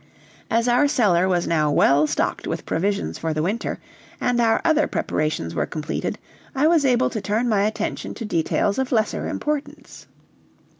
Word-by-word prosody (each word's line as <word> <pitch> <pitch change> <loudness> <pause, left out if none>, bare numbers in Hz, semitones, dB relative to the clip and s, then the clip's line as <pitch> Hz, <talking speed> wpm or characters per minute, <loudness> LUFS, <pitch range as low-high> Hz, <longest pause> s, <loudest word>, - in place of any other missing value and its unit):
As 230 +2 +1
our 245 +4 +4
cellar 195 -10 +2
was 175 -2 +1
now 155 -3 +1
well 145 +1 +4
stocked - - -2
with - - -4
provisions 170 - -1
for 160 -1 -2
the 155 - 0
winter, 210 +7 -2 0.4
and 245 -1 0
our 225 -1 +3
other 310 -2 +3
preparations 155 - -2
were - - -1
completed, 155 -1 -4 0.4
I 275 +3 +2
was 320 -3 +4
able 250 -2 +2
to 215 - -3
turn 215 +5 0
my 210 -4 +2
attention 215 0 -4
to 230 - -6
details 200 +3 0
of 265 0 -2
lesser 220 -3 0
importance. 300 -1 -5
215 Hz, 165 wpm, -22 LUFS, 165-245 Hz, 0.4 s, our